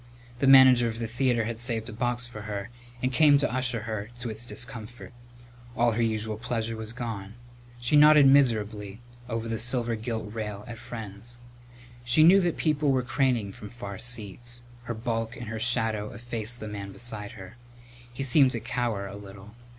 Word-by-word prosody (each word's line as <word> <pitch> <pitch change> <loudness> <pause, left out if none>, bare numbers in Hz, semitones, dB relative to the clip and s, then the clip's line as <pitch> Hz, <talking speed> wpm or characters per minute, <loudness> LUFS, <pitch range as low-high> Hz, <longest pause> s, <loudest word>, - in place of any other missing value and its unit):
The 135 - +2
manager 130 -3 +8
of 115 -1 -4
the 115 - -3
theatre 120 0 +1
had 115 0 -4
saved 115 -2 -1
a 115 - -7
box 120 +1 -1
for 120 -3 -9
her 100 +2 -5 0.3
and 130 +1 0
came 145 +2 +6
to 140 -3 0
usher 125 -3 -1
her 110 -1 -5
to 120 -1 -4
its 110 +3 -8
discomfort. 120 -1 -6 0.6
But - - -11
all 120 0 +4
her 115 +2 -1
usual 110 -1 -1
pleasure 115 -1 -3
was 110 0 -4
gone. 110 -4 -6 0.4
She 125 +5 +1
nodded 150 -1 +8
miserably 110 -7 +2 0.3
over 115 0 -3
the 115 -1 -2
silver 120 -1 +1
gilt 110 -1 -5
rail 105 -2 -5
at 120 -2 -8
friends. 115 +1 -6 0.6
She 120 +6 +4
knew 190 +4 +7
that 175 -2 0
people 150 -2 +1
were 130 -1 +1
craning 125 -5 0
from 105 - -10
far 100 -4 -8
seats. 120 0 -2 0.2
Her 120 - -4
bulk 115 0 -3
and 120 -3 -7
her 115 -1 -4
shadow 110 -2 0
effaced 120 +1 -3
the 110 - -5
man 100 -1 -6
beside 110 -2 -3
her. 95 +3 -11 0.6
He 120 +3 -4
seemed 135 0 +5
to 115 - -2
cower 115 -4 -2
a 100 0 -8
little. 100 +1 -11
115 Hz, 185 wpm, -27 LUFS, 110-125 Hz, 0.6 s, manager